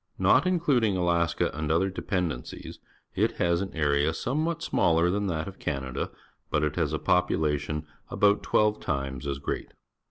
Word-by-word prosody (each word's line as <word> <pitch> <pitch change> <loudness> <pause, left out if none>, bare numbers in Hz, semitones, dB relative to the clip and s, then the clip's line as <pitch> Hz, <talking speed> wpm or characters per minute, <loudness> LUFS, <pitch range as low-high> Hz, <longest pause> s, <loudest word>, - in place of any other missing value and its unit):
Not 140 +8 +4
including 135 - +2
Alaska 85 -2 +1
and 75 0 -2
other 95 +4 +2
de 95 - -6
pendencies, 85 -9 -3 0.3
it - - +1
has 85 0 +1
an 100 - -4
area 75 0 +2
somewhat 155 - -1
smaller 85 - +2
than 100 +1 -1
that 80 -2 -2
of 95 - -9
Canada, 65 -3 -3 0.4
but 75 - +1
it 75 -2 0
has - - 0
a - - 0
population 75 -3 0 0.2
about 105 0 +3
twelve 105 0 +2
times 70 0 -3
as 70 -1 -2
great. 70 - -4
85 Hz, 160 wpm, -27 LUFS, 75-100 Hz, 0.4 s, Not